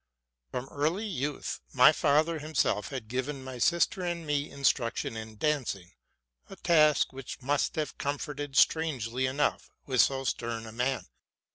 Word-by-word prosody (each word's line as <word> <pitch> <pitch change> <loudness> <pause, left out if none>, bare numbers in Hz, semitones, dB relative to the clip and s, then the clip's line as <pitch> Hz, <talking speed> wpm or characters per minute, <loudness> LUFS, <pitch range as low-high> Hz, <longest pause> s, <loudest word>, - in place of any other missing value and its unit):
From 125 - -4
early 160 +9 -1
youth 150 - -3
my 125 +3 +8
father 155 +2 +2
himself 150 -8 0
had 130 -6 -6
given 130 +3 -3
my 130 -1 -7
sister 170 +7 +2
and 175 -2 -3
me 145 0 -1
instruc 130 -4 +1
tion - - -3
in 110 -1 -7
dancing, 125 - -1 0.6
a - - -9
task 155 -6 +3
which 135 -1 -7
'must 145 +2 0
have 155 -1 -3
comported 145 0 -3
strangely 130 -6 +2
enough 140 +3 0 0.2
with 130 -3 +4
so 135 -1 +1
stern 115 -2 -3
a 110 - -8
man. 125 +3 -1
140 Hz, 150 wpm, -29 LUFS, 125-155 Hz, 0.6 s, my